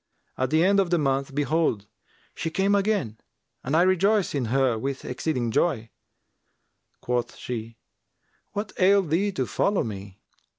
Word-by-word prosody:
At 130 Hz, -1 st, -1 dB
the 155 Hz, +3 st, +3 dB
end 200 Hz, +2 st, +4 dB
of 190 Hz, -3 st, +2 dB
the 175 Hz, -, +3 dB
month 135 Hz, -2 st, -1 dB
behold, 145 Hz, -8 st, +1 dB, 0.5 s
she 165 Hz, -, -3 dB
came 195 Hz, +4 st, +1 dB
again 200 Hz, -, 0 dB, 0.4 s
and 140 Hz, +4 st, -1 dB
I 170 Hz, -, +5 dB
rejoiced 190 Hz, +2 st, +2 dB
in 140 Hz, -4 st, -1 dB
her 130 Hz, +1 st, +2 dB
with 135 Hz, +4 st, -4 dB
exceeding 125 Hz, -3 st, -2 dB
joy. 115 Hz, -6 st, 0 dB, 1.1 s
Quoth 125 Hz, -1 st, -2 dB
she, 115 Hz, -2 st, -6 dB, 0.8 s
'What 205 Hz, 0 st, -3 dB
ailed 190 Hz, -3 st, +4 dB
thee 200 Hz, +5 st, +2 dB
to 130 Hz, -8 st, -1 dB
follow 185 Hz, -, +1 dB
me?' 100 Hz, -3 st, -7 dB
145 Hz, 145 wpm, -25 LUFS, 120-185 Hz, 1.1 s, I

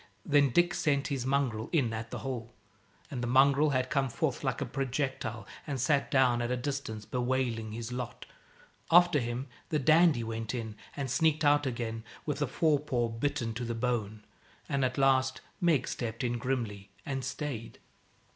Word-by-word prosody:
Then 145 Hz, -2 st, +4 dB
Dick 175 Hz, +6 st, +3 dB
sent 140 Hz, -3 st, +1 dB
his 130 Hz, -3 st, -2 dB
mongrel 130 Hz, -5 st, 0 dB
in 130 Hz, -9 st, +2 dB
at 110 Hz, 0 st, -4 dB
the -, -, -5 dB
hole, 120 Hz, -3 st, -4 dB, 0.6 s
and 130 Hz, -3 st, -3 dB
the 120 Hz, -, -1 dB
mongrel 140 Hz, +4 st, +5 dB
had 130 Hz, -2 st, 0 dB
come 135 Hz, -1 st, +1 dB
forth -, -, -2 dB
like -, -, -1 dB
a -, -, -1 dB
projectile 130 Hz, -5 st, -2 dB, 0.2 s
and 140 Hz, -3 st, -2 dB
sat 140 Hz, +3 st, +2 dB
down 125 Hz, -3 st, +3 dB
at 120 Hz, -, -1 dB
a 125 Hz, -, 0 dB
distance, 125 Hz, -5 st, -4 dB
bewailing 125 Hz, -3 st, -1 dB
his 115 Hz, +2 st, -5 dB
lot. 125 Hz, -1 st, -5 dB, 0.6 s
After 175 Hz, -2 st, +6 dB
him 120 Hz, +1 st, -3 dB, 0.2 s
the 155 Hz, -, +1 dB
Dandie 155 Hz, -2 st, +5 dB
went 115 Hz, +1 st, -3 dB
in 110 Hz, -3 st, -4 dB, 0.2 s
and 135 Hz, -3 st, -2 dB
sneaked 160 Hz, -1 st, +2 dB
out 145 Hz, -1 st, +4 dB
again 115 Hz, -2 st, -3 dB, 0.2 s
with 150 Hz, -1 st, -2 dB
a 145 Hz, -, +2 dB
fore 150 Hz, +2 st, +2 dB
paw 125 Hz, -5 st, -1 dB
bitten 120 Hz, 0 st, -2 dB
to 120 Hz, +2 st, -4 dB
the 115 Hz, 0 st, -3 dB
bone. 110 Hz, -3 st, -2 dB, 0.4 s
And 140 Hz, -1 st, 0 dB
at 125 Hz, -1 st, 0 dB
last 130 Hz, -1 st, +3 dB, 0.2 s
Meg 160 Hz, -8 st, +3 dB
stepped 115 Hz, 0 st, -3 dB
in 120 Hz, -1 st, -1 dB
grimly, 115 Hz, -6 st, -3 dB, 0.2 s
and 135 Hz, -3 st, -3 dB
stayed. 125 Hz, -7 st, -5 dB
130 Hz, 175 wpm, -30 LUFS, 115-140 Hz, 0.6 s, After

